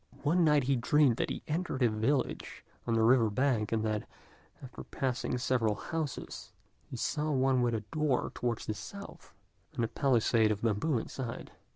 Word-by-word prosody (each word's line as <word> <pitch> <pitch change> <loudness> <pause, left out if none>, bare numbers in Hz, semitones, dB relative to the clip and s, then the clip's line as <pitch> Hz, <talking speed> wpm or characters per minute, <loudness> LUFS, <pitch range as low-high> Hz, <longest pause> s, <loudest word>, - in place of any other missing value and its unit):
One 170 +4 +3
night 150 -3 +4
he 135 +2 +2
dreamed 125 0 +3
that - - -1
he - - -5
entered 155 -4 -1
a - - +6
village 110 +6 -1 0.2
on 115 - +1
the 110 - +3
river 115 -1 +5
bank, 115 -2 +1
and 110 -1 +1
that, 110 -1 -2 0.5
after 130 - -9
passing 125 -1 -2
several 120 -4 +1
houses, 160 -1 -5 0.4
he 125 - -6
saw 150 +5 -1
one 130 -2 +2
with 120 -1 +1
a 110 - -2
door 150 -4 +1
towards 120 -2 -2
the 110 - -2
south, 200 - -10 0.4
and 115 - +1
a - - -2
palisade 115 -4 +2
of 105 +1 -3
bamboos 115 +3 +1
inside. 125 -3 -6
125 Hz, 175 wpm, -31 LUFS, 115-145 Hz, 0.5 s, a